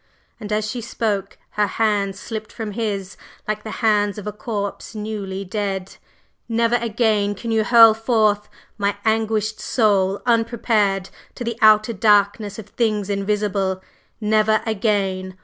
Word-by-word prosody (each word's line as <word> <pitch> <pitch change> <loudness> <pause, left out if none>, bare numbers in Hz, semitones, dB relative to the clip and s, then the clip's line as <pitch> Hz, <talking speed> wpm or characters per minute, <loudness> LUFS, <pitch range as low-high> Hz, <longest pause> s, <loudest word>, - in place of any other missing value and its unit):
And 210 0 -7
as 215 0 0
she 240 +3 -4
spoke 210 -4 -3
her 210 -1 +1
hands 200 -2 0
slipped 220 -1 -6
from 220 -2 -5
his 200 -3 -3 0.3
like 215 0 -2
the 215 - -8 0.2
hands 205 -2 +2
of 210 - -7
a 210 - -3
corpse 210 -1 -5
newly 205 -2 -5
dead. 195 -1 -4 0.5
"Never 230 +1 +2
again 215 -3 0
can 230 +3 -5
you 220 -1 +2
hurl 230 0 +8
forth 215 -2 +1 0.3
my 200 0 +1
anguished 220 -1 0
soul 200 -4 +1
unprepared 225 -5 +1 0.2
to - - -5
the 235 -1 -3
outer 215 +1 +5
darkness 205 0 +2
of 215 -2 -9
things 210 -4 -1
invisible; 200 -1 -1 0.4
never 215 0 +2
again! 195 -4 -1
210 Hz, 140 wpm, -21 LUFS, 200-220 Hz, 0.5 s, hurl